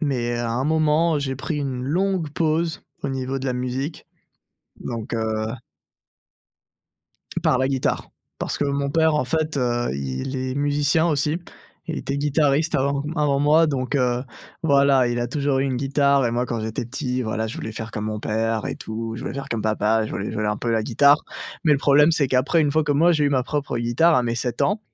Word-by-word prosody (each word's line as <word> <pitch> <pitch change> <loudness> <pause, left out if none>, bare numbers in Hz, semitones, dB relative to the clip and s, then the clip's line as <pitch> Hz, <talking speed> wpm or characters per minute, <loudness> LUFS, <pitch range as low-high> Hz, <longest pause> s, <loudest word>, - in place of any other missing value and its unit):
mais 125 -6 -1
à 120 -1 -2
un 130 +3 -1
moment, 155 +1 +2
j'ai 135 -2 -2
pris 150 +4 -4
une 135 -3 -3
longue 175 +3 0
pause 160 +1 -1 0.2
au 140 - -1
niveau 135 0 -3
de 135 - -4
la 125 - 0
musique, 130 +5 -4 0.7
donc 115 -2 -6
heu 110 -1 -1 1.9
Par 130 - +3
la 130 +1 +1
guitare. 135 -2 -1 0.3
Parce - - -3
que - - +1
mon 140 0 -1
père, 160 0 +3
en 150 - +1
fait, 155 +2 -1
heu, 120 -2 0
il 70 - -4
est 130 0 -3
musicien 145 +3 +2
aussi. 150 +1 0 0.5
Il 165 -2 -3
était 140 - -3
guitariste 145 +1 +1
avant 140 +1 0
avant 145 -3 +1
moi, 155 +3 +5
donc 135 -2 -2
heu, 125 -2 +1 0.4
voilà, 140 -4 +4
il 120 0 -1
a 120 - 0
toujours 140 +1 0
eu 135 - +1
une 130 -2 -1
guitare 140 +1 +2
et 120 - +1
moi 120 +1 -1
quand 120 - -2
j'étais 110 +2 -3
petit, 130 0 -3
voilà, 110 -1 -2
je 110 - -6
voulais 110 - -5
faire 110 0 -6
comme 105 0 -4
mon 105 -1 -3
père 110 0 -1
et - - -3
tout, 110 +1 -5
je 120 - -7
voulais 135 - -5
faire 140 0 -6
comme 115 - -1
papa, 110 +1 +1
je - - -8
voulais 100 - -4
jouer 110 -1 -2
un 105 0 0
peu 120 - -2
la 110 -1 +1
guitare, 140 +6 +5 0.4
mais 155 - +4
le 140 - +3
problème 145 +3 +5
c'est 155 -4 +2
qu'après 130 +6 +2
une 145 - +2
fois 155 0 +2
que, 145 - +1
moi, 165 +5 +4
j'ai 150 -2 +2
eu - - +4
ma 135 -3 +1
propre 140 -2 -3
guitare 120 +9 +3
à 125 - +3
mes 115 -1 -1
7 120 0 -2
ans, 210 +2 +1
135 Hz, 215 wpm, -23 LUFS, 120-150 Hz, 1.9 s, moi